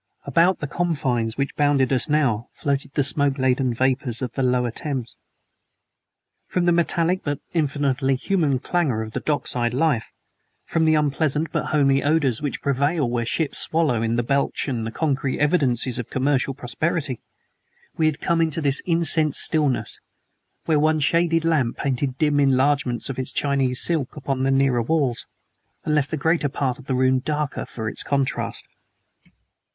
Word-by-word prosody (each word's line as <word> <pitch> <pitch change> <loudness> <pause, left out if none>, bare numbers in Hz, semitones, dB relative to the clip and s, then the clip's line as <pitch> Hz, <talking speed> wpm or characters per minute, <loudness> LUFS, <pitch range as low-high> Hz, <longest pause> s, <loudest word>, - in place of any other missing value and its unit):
About 175 +2 +3
the - - -1
scented 140 - -10
confines 130 -10 0
which 140 0 -2
bounded 145 -3 +2
us 130 +4 0
now 130 -7 +1
floated 140 0 -2
the 145 - +2
smoke 140 0 +1
laden 130 -1 +1
vapors 130 0 0
of 125 - -3
the 135 - -3
Lower 125 -2 +1
Thames. 130 -2 -5 1.3
From 180 -1 0
the 175 - +4
metallic 170 +1 +1
but 145 -2 -2
infinitely 140 -4 0
human 150 -2 0
clangor 135 -6 -1
of 110 - -8
dock 150 -2 0
side 120 0 -1
life, 140 -5 0 0.5
from 165 -1 0
the 155 0 +4
unpleasant 150 +1 0
but - - -1
homely 140 -2 +2
odors 145 -5 +1
which 145 -2 -4
prevail 140 +1 +1
where 120 -1 -1
ships 155 +4 +1
swallow 155 -9 +1
in 115 +1 0
and 120 0 -1
belch 140 +2 0
out 120 -5 -2
the 115 - -4
concrete 140 -2 -1
evidences 135 -6 +1
of 120 - -5
commercial 135 0 0
prosperity, 130 +2 -2 0.7
we 160 - +2
had 155 -1 -1
come 170 0 +1
into 160 -1 0
this 140 -2 0
incensed 160 -3 +3
stillness, 150 -5 +1 0.7
where 155 -2 +2
one 155 +1 +2
shaded 165 +2 +2
lamp 145 -8 +1
painted 130 -1 -2
dim 150 -1 +2
enlargements 135 -2 +1
of 130 - -7
its 130 - -3
Chinese 135 -3 +1
silk 160 -7 +1
upon 135 -2 -3
the 135 - +1
nearer 135 -2 +2
walls, 130 -2 -1 0.6
and 155 - 0
left 145 -2 +1
the 160 - -2
greater 160 0 +1
part 135 -2 -2
of 135 - -13
the 130 - -1
room 130 0 +3
the 130 - -15
darker 150 -2 -2
for 110 -2 -6
its - - -2
contrast. 140 -2 -2
140 Hz, 170 wpm, -23 LUFS, 130-155 Hz, 1.3 s, the